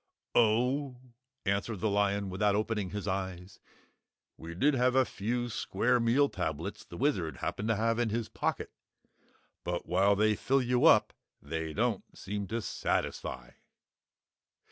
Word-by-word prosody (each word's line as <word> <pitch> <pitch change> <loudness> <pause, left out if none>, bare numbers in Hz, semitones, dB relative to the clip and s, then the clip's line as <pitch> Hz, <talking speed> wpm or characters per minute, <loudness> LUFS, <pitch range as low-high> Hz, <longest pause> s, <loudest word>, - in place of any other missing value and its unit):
"Oh," 125 +4 +2 0.5
answered 100 +1 -1
the 110 - 0
lion 100 -1 +1
without 100 +2 +2
opening 105 -2 -1
his 105 0 -5
eyes, 95 0 -4 0.8
"we 85 +1 -9
did 145 - +3
have 125 0 +2
a 130 -1 +5
few 120 +4 -2
square 125 +2 +1
meal 120 +5 +3
tablets 80 - -4
the - - -11
Wizard - - 0
happened 105 - -3
to 115 - +2
have 115 +2 +1
in 120 -2 +1
his 115 +1 -2
pocket. - - -2 0.9
But, 90 0 -3
while 95 +3 +3
they 110 +1 +3
fill 135 +5 +1
you 125 0 +2
up, - - +6 0.3
they 80 +2 -4
don't 115 +3 -2
seem 100 +1 -4
to 115 +2 -3
satisfy." - - -2
105 Hz, 145 wpm, -31 LUFS, 95-120 Hz, 0.9 s, up